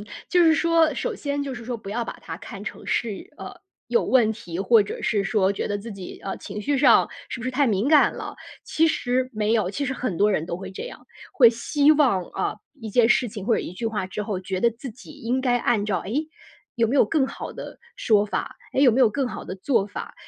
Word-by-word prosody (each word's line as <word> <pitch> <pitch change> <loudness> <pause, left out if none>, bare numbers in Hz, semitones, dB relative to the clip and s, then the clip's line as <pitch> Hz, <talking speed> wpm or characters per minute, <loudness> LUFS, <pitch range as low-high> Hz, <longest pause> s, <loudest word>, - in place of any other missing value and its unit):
嗯。 - - -13 0.2
就 355 -1 +4
是 320 -1 +6
说 330 -1 +3
首 485 - -2
先 285 -5 -3
就 275 -2 -4
是 245 -1 -9
说 240 +1 -3
不 210 -3 -9
要 235 +2 -2
把 - - -7
它 - - -7
看 - - -9
成 - - -7
是， 220 -4 -2
呃， - - -8 0.4
有 470 - +2
问 235 -4 +3
题， 175 -6 -7
或 215 +3 +5
者 200 - -6
是 215 -1 +1
说 195 -1 +2
觉 - - -3
得 205 - -1
自 220 +2 -8
己， 190 -2 -9
呃， 195 - -3
情 210 - -7
绪 285 +6 0
上 290 - +5 0.2
是 - - -5
不 - - -6
是 255 - -1
太 275 +2 +2
敏 215 +2 +1
感 305 -1 +5
了。 - - -6 0.3
其 325 +1 +2
实 255 -3 0
没 215 0 0
有， 215 -5 +1
其 280 +8 -3
实 270 - -2
很 255 -8 -3
多 210 +4 +3
人 160 - 0
都 170 - -3
会 190 +1 -8
这 190 - -7
样。 - - -10 0.3
会 245 -4 +7
希 285 +6 +3
望， 270 -11 +3
啊， - - -2 0.2
一 225 - -6
件 235 +1 +4
事 245 0 +3
情 205 -2 -7
或 230 - +3
者 - - 0
一 - - -7
句 225 +5 -4
话 210 -4 -2
之 210 - -5
后， 200 -3 -3
觉 185 0 -4
得 235 - +4
自 235 +3 -8
己 250 - -13
应 245 +3 -2
该 245 -2 +2
按 225 -5 +1
照- 205 -3 0
诶， 290 +10 -2 0.5
有 230 -2 +2
没 245 - -1
有 - - +6
更 295 -5 +1
好 - - -7
的 - - -9 0.2
说 210 -2 +3
法？ 210 - -4 0.2
诶， 270 - +2
有 255 - +7
没 250 - +1
有 245 - +6
更 265 +5 -1
好 - - -7
的 - - -6
做 210 0 +1
法？ 205 - -7
230 Hz, 275 characters per minute, -24 LUFS, 205-265 Hz, 0.5 s, 会